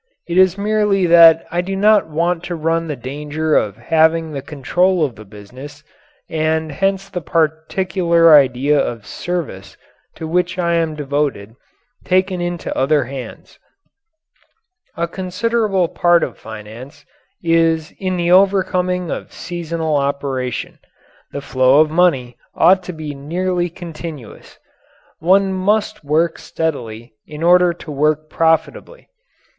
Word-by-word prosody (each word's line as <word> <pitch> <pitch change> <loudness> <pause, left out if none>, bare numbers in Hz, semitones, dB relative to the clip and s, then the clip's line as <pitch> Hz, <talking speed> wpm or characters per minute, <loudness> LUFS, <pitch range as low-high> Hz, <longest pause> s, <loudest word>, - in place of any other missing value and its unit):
It 170 - -3
is 185 0 +4
merely 205 -2 +1
that 165 -1 +7
I 175 +1 0
do 195 +2 -4
not 210 0 +3
want 165 +2 -1
to 175 - -4
run 165 +1 -1
the 150 - -3
danger 150 +4 -3
of 100 -2 0
having 160 0 +1
the 140 -2 -5
control 160 +5 0
of 130 -5 -6
the 110 +1 -12
business 130 +9 -12 0.4
and 160 0 -1
hence 195 +5 -1
the 180 - -5
particular 165 +1 +2
idea 140 +1 +4
of 115 -5 -3
service 165 - -5 0.4
to 160 - -6
which 180 +2 -1
I 170 -1 0
am 165 -2 0
devoted 140 -7 -3 0.5
taken 185 0 0
into 175 -1 -4
other 145 +2 +2
hands. 130 +1 -9 1.4
A 170 0 -1
considerable 195 +1 -1
part 175 +1 +2
of - - -4
finance 110 +7 -11 0.4
is 165 -1 +1
in 185 -1 -2
the 175 0 0
overcoming 185 -2 +2
of - - -6
seasonal 165 -3 -3
operation. 140 -3 -3 0.5
The 140 - -5
flow 130 +1 +3
of 155 0 +3
money 145 -8 +1 0.2
ought 185 +1 +4
to 180 - -5
be 155 -2 -6
nearly 175 +5 -2
continuous. 165 - -10 0.6
One 190 +3 +3
must 210 +1 -1
work 160 +3 0
steadily 120 -8 -5
in 150 +1 -8
order 180 +1 +5
to 170 -2 -10
work 150 +2 0
profitably. 160 - -1
165 Hz, 130 wpm, -18 LUFS, 145-180 Hz, 1.4 s, that